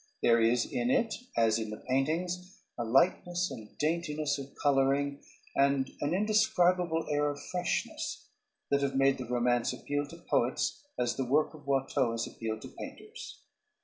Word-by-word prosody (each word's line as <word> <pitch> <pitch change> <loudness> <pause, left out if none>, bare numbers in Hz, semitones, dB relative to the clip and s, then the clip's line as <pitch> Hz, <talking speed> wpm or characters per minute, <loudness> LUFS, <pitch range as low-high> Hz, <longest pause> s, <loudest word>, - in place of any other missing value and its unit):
There 115 0 +5
is 115 +1 +3
in 120 0 -1
it, 225 - +2 0.2
as 115 -1 +4
in 110 -1 -3
the 105 - -5
paintings, 175 +8 -1 0.2
a 120 - -2
lightness 175 +8 +2
and 110 -5 -10
daintiness 150 -2 0
of 140 0 -9
coloring, 140 0 +2 0.3
and 140 -1 +2
an 145 +4 +1
indescribable 185 -5 +2
air 145 0 +2
of 145 0 -5
freshness 180 -1 -2 0.5
that 140 0 +3
have 140 -1 0
made 135 0 +3
the 130 - -4
romance 120 0 +1
appeal 145 0 -2
to 170 - -11
poets 130 - 0
as 120 -1 0
the 135 - 0
work 145 +6 +2
of 145 -2 -14
Watteau 135 -3 +1
has 115 0 -1
appealed 110 -1 -5
to - - -8
painters. 485 +4 -10
140 Hz, 160 wpm, -31 LUFS, 125-170 Hz, 0.5 s, There